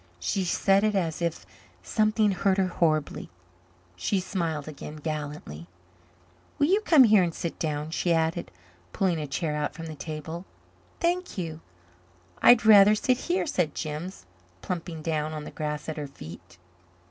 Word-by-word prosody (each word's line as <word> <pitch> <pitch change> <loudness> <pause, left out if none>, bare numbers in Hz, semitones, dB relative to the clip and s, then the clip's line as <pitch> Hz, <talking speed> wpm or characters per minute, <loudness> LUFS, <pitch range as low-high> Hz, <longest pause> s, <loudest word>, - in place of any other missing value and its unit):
She 185 - -1
said 195 +3 +3
it 215 -1 +2
as 170 -4 -1
if 170 -11 -2 0.4
something 215 - +2
hurt 190 +1 +1
her 190 -1 +2
horribly. 155 -4 0 0.7
She 190 - 0
smiled 165 -6 -3
again 150 0 -8
gallantly. 150 - -6 0.9
"Will 285 - +3
you 390 +7 +3
come 315 -10 +6
here 215 -4 +6
and 170 -2 -1
sit 170 - -4
down?" 150 -1 -2
she 170 +1 0
added, 165 +1 0 0.4
pulling 180 -4 +1
a 150 - -4
chair 150 +2 -2
out 150 0 -2
from 165 0 -7
the 160 - -6
table. 160 +2 -6 0.6
"Thank 355 - -1
you. 165 -3 -4 0.8
I'd 240 -2 +7
rather 210 -1 +8
sit 250 +4 +1
here," 360 - +1
said 180 - -1
Jims, 155 - -5 0.4
plumping 170 -3 -5
down 155 -1 -1
on 155 -1 -5
the - - -8
grass 150 -1 -4
at 160 - -4
her 150 -1 -4
feet. 85 -6 -12
165 Hz, 160 wpm, -27 LUFS, 150-195 Hz, 0.9 s, rather